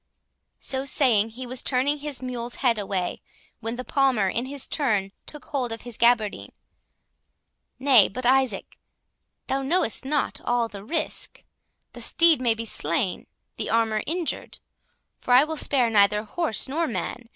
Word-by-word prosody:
So 265 Hz, -1 st, -1 dB
saying, 240 Hz, -6 st, +3 dB
he 250 Hz, +3 st, -8 dB
was 250 Hz, +1 st, -2 dB
turning 280 Hz, +3 st, +1 dB
his 285 Hz, -3 st, -6 dB
mule's 245 Hz, -1 st, -4 dB
head 230 Hz, -3 st, +3 dB
away, 195 Hz, -3 st, -3 dB, 0.4 s
when 225 Hz, +2 st, -4 dB
the 255 Hz, +1 st, -6 dB
Palmer, 260 Hz, -8 st, +2 dB
in 235 Hz, +6 st, -2 dB
his 275 Hz, -1 st, -1 dB
turn, 210 Hz, -10 st, 0 dB, 0.2 s
took 300 Hz, -, -8 dB
hold 260 Hz, -5 st, -2 dB
of 225 Hz, -, -5 dB
his 240 Hz, -2 st, -7 dB
gaberdine. 230 Hz, -3 st, +1 dB, 1.2 s
"Nay, 260 Hz, -7 st, +6 dB
but 250 Hz, +6 st, -6 dB
Isaac, 260 Hz, -5 st, +1 dB, 0.7 s
thou 270 Hz, +1 st, -1 dB
knowest 275 Hz, -4 st, +1 dB
not 285 Hz, +2 st, -1 dB
all 240 Hz, -1 st, +1 dB
the 200 Hz, -3 st, -10 dB
risk. 315 Hz, +9 st, -3 dB, 0.5 s
The -, -, -8 dB
steed 335 Hz, -5 st, +4 dB
may 235 Hz, -3 st, +2 dB
be 230 Hz, +1 st, -5 dB
slain, 170 Hz, -2 st, -1 dB, 0.3 s
the -, -, -2 dB
armour 225 Hz, -1 st, +1 dB
injured—for 330 Hz, -5 st, -6 dB
I 255 Hz, -, +8 dB
will 315 Hz, +1 st, -3 dB
spare 260 Hz, -6 st, +1 dB
neither 210 Hz, 0 st, +4 dB
horse 225 Hz, +3 st, -1 dB
nor 320 Hz, +5 st, -1 dB
man. 230 Hz, +3 st, -5 dB
245 Hz, 150 wpm, -25 LUFS, 220-275 Hz, 1.2 s, I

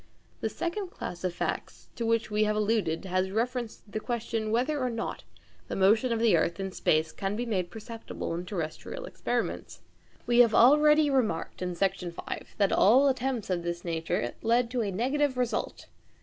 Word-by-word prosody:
The -, -, -1 dB
second 360 Hz, +3 st, -3 dB
class 180 Hz, -, -7 dB
of 185 Hz, -, 0 dB
facts 175 Hz, -, -4 dB
to 230 Hz, -1 st, -2 dB
which 230 Hz, -1 st, +1 dB
we 210 Hz, +1 st, +2 dB
have 210 Hz, 0 st, +1 dB
alluded 210 Hz, -6 st, 0 dB
has 185 Hz, 0 st, 0 dB
reference 235 Hz, +2 st, -2 dB
to 205 Hz, -, -23 dB
the 215 Hz, -, -2 dB
question 225 Hz, -1 st, -2 dB
whether 260 Hz, +6 st, +1 dB
or 255 Hz, -1 st, 0 dB
not 230 Hz, -1 st, -4 dB, 0.4 s
the -, -, -4 dB
motion 215 Hz, +6 st, +4 dB
of 230 Hz, -, +1 dB
the 225 Hz, -4 st, +4 dB
earth 170 Hz, +3 st, 0 dB
in 195 Hz, 0 st, -3 dB
space 160 Hz, -3 st, +1 dB
can 195 Hz, +1 st, -3 dB
be 240 Hz, +3 st, -2 dB
made 185 Hz, -6 st, -1 dB
perceptible 225 Hz, -4 st, -6 dB
in 175 Hz, +2 st, -4 dB
terrestrial 180 Hz, -, -5 dB
experiments. -, -, -3 dB, 0.4 s
We 240 Hz, 0 st, +3 dB
have 235 Hz, -3 st, +6 dB
already 300 Hz, +4 st, +6 dB
remarked 220 Hz, -14 st, 0 dB
in 180 Hz, -1 st, -2 dB
Section 185 Hz, -1 st, -1 dB
5 170 Hz, -, -7 dB
that 200 Hz, -2 st, +3 dB
all 260 Hz, +7 st, +6 dB
attempts 255 Hz, -5 st, -1 dB
of 175 Hz, -1 st, 0 dB
this 170 Hz, 0 st, -4 dB
nature 165 Hz, -8 st, -1 dB
led 235 Hz, +1 st, +2 dB
to 250 Hz, -1 st, 0 dB
a 210 Hz, -, -1 dB
negative 260 Hz, +7 st, 0 dB
result. 250 Hz, -1 st, -2 dB
220 Hz, 185 wpm, -28 LUFS, 185-245 Hz, 0.4 s, have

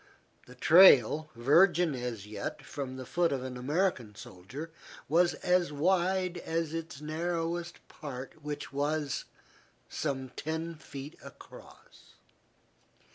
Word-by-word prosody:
The 125 Hz, -, -13 dB
trail, 155 Hz, -, +6 dB
virgin 165 Hz, +6 st, +4 dB
as 120 Hz, -5 st, -5 dB
yet 105 Hz, -1 st, -6 dB
from 130 Hz, -2 st, -6 dB
the 130 Hz, -, -7 dB
foot 170 Hz, +5 st, +1 dB
of 135 Hz, -2 st, -2 dB
an 130 Hz, -1 st, -6 dB
American 130 Hz, -, -1 dB
soldier, 125 Hz, -, -9 dB, 0.4 s
was 175 Hz, +3 st, +3 dB
as 180 Hz, -2 st, +2 dB
wide 180 Hz, +3 st, +1 dB
as 165 Hz, -1 st, -2 dB
its 165 Hz, -3 st, -6 dB
narrowest 170 Hz, +2 st, -3 dB
part, 135 Hz, +1 st, -8 dB
which 150 Hz, -1 st, -6 dB
was 145 Hz, 0 st, -1 dB, 0.6 s
some 135 Hz, -3 st, -3 dB
ten 160 Hz, +5 st, -4 dB
feet 140 Hz, -1 st, -9 dB
across. -, -, -15 dB
150 Hz, 115 wpm, -30 LUFS, 130-170 Hz, 0.6 s, trail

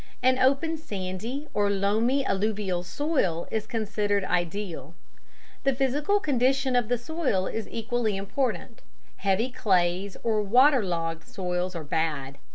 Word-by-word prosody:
An 255 Hz, 0 st, +4 dB
open 280 Hz, +5 st, +2 dB
sandy 215 Hz, -, -5 dB
or 205 Hz, -1 st, +2 dB
loamy 220 Hz, +7 st, +2 dB
alluvial 195 Hz, -3 st, 0 dB
soil 180 Hz, -, -1 dB
is 215 Hz, -1 st, -2 dB
considered 205 Hz, -3 st, 0 dB
ideal. 175 Hz, -4 st, -2 dB, 0.7 s
The 275 Hz, -2 st, +2 dB
physical 285 Hz, +9 st, +1 dB
condition 265 Hz, -3 st, +1 dB
of 245 Hz, -3 st, +2 dB
the 245 Hz, +1 st, +1 dB
soil 250 Hz, -, -1 dB
is 225 Hz, +2 st, -4 dB
equally 230 Hz, -2 st, -1 dB
important: 230 Hz, +3 st, -2 dB, 0.4 s
heavy 205 Hz, +6 st, +1 dB
clays 185 Hz, -3 st, +1 dB
or 220 Hz, -2 st, +2 dB
water 250 Hz, +5 st, +5 dB
logged 165 Hz, -3 st, -2 dB
soils 180 Hz, -1 st, -2 dB
are 165 Hz, -, -4 dB
bad. 145 Hz, -3 st, -2 dB
210 Hz, 130 wpm, -27 LUFS, 185-255 Hz, 0.7 s, water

